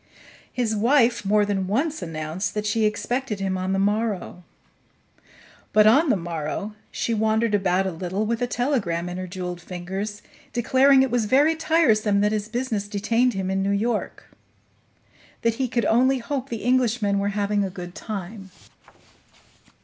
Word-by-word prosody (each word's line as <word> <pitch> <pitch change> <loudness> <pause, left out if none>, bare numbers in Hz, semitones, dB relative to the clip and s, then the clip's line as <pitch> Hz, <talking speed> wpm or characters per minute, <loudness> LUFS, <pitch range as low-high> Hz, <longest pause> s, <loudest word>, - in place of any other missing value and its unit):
His 230 -3 -1
wife 235 +1 +3
more 210 +1 +3
than 195 -2 -1
once 290 - -1
announced 160 +5 -4
that 210 0 -2
she 215 +1 +1
expected 215 +1 -2
him 190 -1 -1
on 185 0 -2
the 195 - +1
morrow; 205 -3 -1 1.3
but 215 0 +6
on 275 +9 +5
the - - +4
morrow 170 +3 -4 0.2
she 230 - -2
wandered 220 0 +1
about 190 -1 +2
a 190 - -1
little, 185 +5 -3
with 230 +2 -2
a 245 - +1
telegram 235 -10 -1
in 180 - -5
her 185 0 -5
jeweled 180 -1 -5
fingers, 190 +4 -6 0.3
declaring 265 +3 +4
it 265 - -1
was 240 -3 +1
very 285 +8 +4
tiresome 225 -11 +2
that 210 +1 +2
his 215 0 -2
business 225 -4 -2
detained 225 +4 +1
him 190 0 -2
in 195 0 0
New 195 - 0
York; 215 +3 -2 1.1
that 230 0 +2
he 260 - +1
could 235 -1 -1
only 260 +4 +3
hope 265 +1 -4
the 230 -1 -5
Englishmen 240 -5 +2
were 200 0 0
having 205 0 +1
a 195 - -2
good 180 -1 -8
time. 195 -1 -7
210 Hz, 165 wpm, -24 LUFS, 195-240 Hz, 1.3 s, but